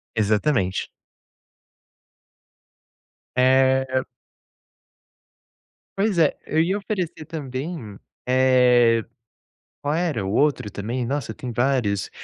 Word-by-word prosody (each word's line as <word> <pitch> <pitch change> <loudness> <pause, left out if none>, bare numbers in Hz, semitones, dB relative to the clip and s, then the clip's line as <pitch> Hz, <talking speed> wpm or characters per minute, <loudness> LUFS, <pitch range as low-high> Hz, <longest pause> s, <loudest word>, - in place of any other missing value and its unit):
Exatamente. 105 - +1 2.5
Eh 130 0 +3 1.9
Pois 200 -1 +1
é, 160 -3 +3
eu 155 - 0
ia 175 +4 +2
oferecer 185 -6 -4
também, 135 - -6 0.3
eh, 125 -3 +4 0.8
qual 145 +1 0
era 160 - -1
o 95 - -2
outro 145 0 +1
também? 120 +6 -3
Nossa, 135 -2 -3
tem 125 +3 -7
vários. 120 -5 0
130 Hz, 85 wpm, -23 LUFS, 115-150 Hz, 2.5 s, eh